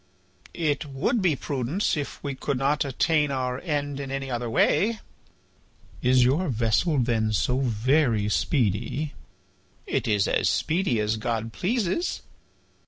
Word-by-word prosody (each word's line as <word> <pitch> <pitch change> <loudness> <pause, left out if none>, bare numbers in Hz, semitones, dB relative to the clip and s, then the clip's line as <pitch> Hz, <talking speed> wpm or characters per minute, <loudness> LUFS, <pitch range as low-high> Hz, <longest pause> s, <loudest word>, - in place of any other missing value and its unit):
"It 150 -4 0
would 145 - 0
be 175 -5 +2
prudence 140 - -1
if 145 -2 -5
we 140 -1 -2
could 135 0 -2
not 140 +3 +1
attain 150 +2 +1
our 130 -2 -2
end 145 -4 -2
in 140 -1 -5
any 135 -1 -4
other 120 -1 -2
way." 210 - +2 1.0
"Is 125 0 +4
your 145 +9 +2
vessel 120 +7 +1
then 115 -3 +1
so 125 +5 +1
very 120 -2 +2
speedy?" 120 +6 0 0.7
"It - - -1
is 105 -3 +2
as - - +2
speedy 165 - +1
as 105 +1 0
God 115 0 -3
pleases." 230 - -1
135 Hz, 135 wpm, -25 LUFS, 120-150 Hz, 1.0 s, Is